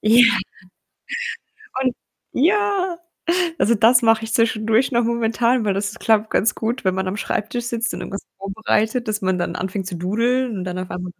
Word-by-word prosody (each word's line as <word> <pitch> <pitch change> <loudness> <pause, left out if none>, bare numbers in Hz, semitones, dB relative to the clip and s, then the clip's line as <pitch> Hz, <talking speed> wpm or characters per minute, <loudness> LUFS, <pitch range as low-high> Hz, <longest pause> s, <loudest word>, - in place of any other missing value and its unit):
Ja. 230 +3 +6 1.6
Und 255 -2 +1 0.4
ja, 380 +2 +1 0.6
also, 235 - +3
das 230 +3 +5
mache 225 -1 +3
ich 225 - -6
zwischendurch 225 +2 +2
noch 235 0 +2
momentan, 235 +1 +1
weil 200 - +1
das 200 +1 -2
klappt 220 -2 +2
ganz 225 - +2
gut, 230 +2 -3
wenn 185 -1 +2
man 190 0 -2
am 190 - -3
Schreibtisch 225 +4 -2
sitzt 235 -1 -1
und - - -6
irgendwas 195 - -6
vorbereitet, 220 +4 -1
dass 215 0 -1
man 185 -1 +1
dann - - -2
anfängt 190 0 -3
zu 180 - -4
doodeln 230 +7 0
und 180 - -4
dann 185 0 -4
auf 185 - -5
einmal 180 0 -5
225 Hz, 175 wpm, -21 LUFS, 195-240 Hz, 1.6 s, Ja